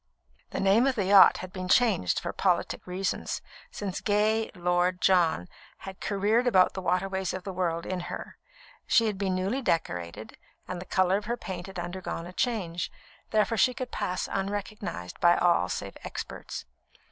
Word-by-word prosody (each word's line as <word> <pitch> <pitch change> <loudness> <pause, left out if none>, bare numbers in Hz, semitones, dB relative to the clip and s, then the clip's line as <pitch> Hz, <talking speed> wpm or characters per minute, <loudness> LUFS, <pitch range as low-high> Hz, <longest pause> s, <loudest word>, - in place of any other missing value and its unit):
The - - -4
name 200 +7 +4
of 265 - +1
the 205 -5 0
yacht 195 +1 +8
had 185 - -14
been 185 -1 -4
changed, 205 - +3
for - - -4
politic - - 0
reasons, 185 +2 -2 0.3
since 195 -3 -5
gay 215 +1 +2
Lord 180 +1 +1
John 170 - +3 0.3
had 190 -1 -9
careered 210 +5 +1
about 185 -6 +5
the 190 - -4
waterways 190 +1 -1
of 185 - -6
the 195 - -5
world 170 -2 -1
in 185 -1 -2
her; - - -7 0.5
she 230 - +4
had 210 -3 -2
been 190 -2 0
newly 195 +9 -1
decorated, 85 - -2 0.3
and 180 -1 -5
the - - -8
colour 185 +1 +2
of 210 - -6
her 235 +2 -2
paint 185 -4 -6
had 190 -1 -9
undergone 175 -1 -4
a 180 - -9
change, 185 -8 -1 0.4
therefore 215 +1 +2
she 250 +4 +4
could 255 -1 -5
pass 180 0 -2
unrecognised 195 - -4
by 175 0 +5
all 175 -1 +3
save - - -4
experts. - - -6
190 Hz, 170 wpm, -28 LUFS, 180-210 Hz, 0.5 s, yacht